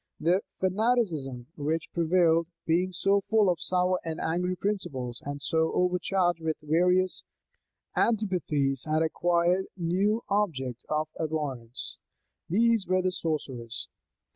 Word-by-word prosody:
The 175 +5 +3 0.2
fanaticism 185 - 0
which 155 +2 -2
prevailed, 170 -1 +3 0.2
being 175 +3 +2
so 195 +3 +2
full 215 -4 +4
of 175 - -3
sour 180 0 +1
and 160 -1 -4
angry 180 +3 0
principles, 155 - -3
and 145 0 -5
so 160 +1 +1
overcharged 180 -1 +1
with 160 -1 -1
various 180 +4 +2 0.7
antipathies, 170 - +1
had 155 +1 +2
acquired 175 +3 +2
a - - -22
new 195 +7 +1
object 135 - -1
of 155 0 0
abhorrence: 145 -7 -3 0.5
these 225 +2 +3
were 185 0 +2
the 185 - +1
sorcerers. 130 -9 -3
170 Hz, 120 wpm, -28 LUFS, 155-185 Hz, 0.7 s, full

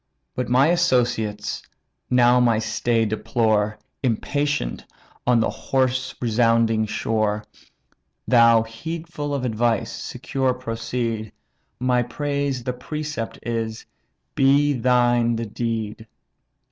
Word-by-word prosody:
But 125 - -3
my 130 +5 +4
associates 120 -11 +1 0.5
now 125 0 +5
my 120 -3 +3
stay 115 +1 0
deplore, 110 -1 0 0.2
Impatient 145 - -1 0.4
on 125 -1 +5
the - - +1
hoarse 130 -1 -1
resounding 115 -1 +2
shore. 105 -1 -1 0.8
Thou, 115 -2 +6
heedful 155 +5 -6
of 140 -3 -1
advice, 115 -1 0
secure 130 -2 -2
proceed; 115 -2 -3 0.5
My 125 -1 +2
praise 140 0 -2
the 125 0 -2
precept 145 -1 -5
is, 115 -1 -3 0.5
be 140 +2 +4
thine 120 -1 +2
the 115 +1 -3
deed. 110 0 -4
120 Hz, 100 wpm, -23 LUFS, 115-130 Hz, 0.8 s, Thou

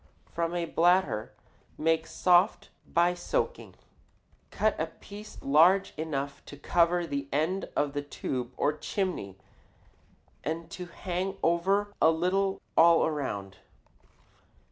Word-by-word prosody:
From 170 +1 -3
a 170 -1 -1
bladder 175 - +2 0.5
made 160 +1 +1
soft 180 +3 +3 0.2
by 175 +1 +2
soaking, 485 - -3 0.7
cut 215 0 +1
a 160 - 0
piece 205 +6 -12
large 170 +8 +4
enough 140 -3 -4
to 145 - -10
cover 175 +3 +2
the 140 -3 -4
end 160 +7 -1
of 145 -1 0
the 145 - -2
tube 130 -3 -4
or 150 - +2
chimney 160 - -3 1.1
and 165 +2 -4
to 180 0 -7
hang 185 +2 -4
over 195 +5 +1
a 160 - +7
little 185 +4 0
all 170 0 +6
around. 100 -11 -4
170 Hz, 120 wpm, -29 LUFS, 150-185 Hz, 1.1 s, a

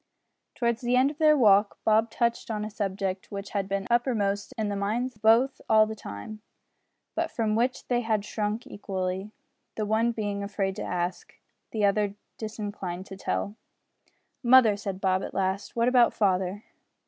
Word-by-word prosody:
Towards 235 -2 0
the 245 0 +1
end 260 +3 +4
of 300 - -14
their 305 -1 +5
walk, 205 -4 +4
Bob 220 +1 +4
touched 235 +1 -1
on 210 -1 -2
a 215 - -6
subject 195 -2 -3
which 200 0 -6
had 200 -2 -2
been 195 0 -1
uppermost 210 -5 +1
in 220 -1 0
the 205 - -2
minds 220 +6 -1
of 210 - -25
both 230 +5 +4
all 215 0 +6
the 220 - -5
time, 215 - -8 0.7
but - - -1
from 220 -2 0
which 245 +3 0
they 245 -1 +1
had 220 -3 0
shrunk 210 +2 -2
equally, 190 0 -4 0.5
the 215 - -1
one 220 +3 +2
being 205 -3 -3
afraid 195 -1 -2
to - - -4
ask, 175 0 -3 0.3
the 215 -2 +1
other 200 0 +1 0.2
disinclined 205 -4 -5
to 195 - -9
tell. 200 +1 -3 0.9
"Mother," 240 -4 +6
said 195 -2 -5
Bob, 190 -1 +2
at - - -6
last, 195 +1 -1
"what 235 0 +2
about 250 -1 +4
father?" 190 0 +1
210 Hz, 170 wpm, -27 LUFS, 195-230 Hz, 0.9 s, all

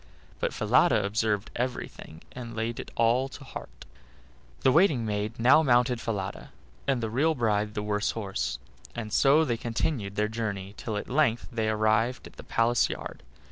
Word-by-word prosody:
But - - 0
Falada - - +3
observed 105 0 0
everything, 120 -10 -5
and 120 -2 -8
laid 115 +1 -2
it - - -6
all 120 +4 +2
to - - -11
heart. - - -10 0.8
The 130 - +4
waiting 155 - +4
maid 105 +2 -3
now 125 +6 +6
mounted 125 -3 +3
Falada, 100 -3 -4 0.4
and 130 -4 +1
the 110 - -1
real 155 +7 +2
bride 105 -4 0
the 105 - -2
worse 105 0 0
horse, 100 -4 -3 0.4
and 110 -3 -5
so 145 +3 +5
they 120 -5 -1
continued 115 -2 -2
their 105 0 +1
journey 105 -3 -4
till 110 -3 -4
at - - -5
length 125 -4 +1
they 110 -2 0
arrived 110 +3 +1
at - - -12
the - - -9
palace 115 +1 +2
yard. - - -6
115 Hz, 170 wpm, -28 LUFS, 105-125 Hz, 0.8 s, now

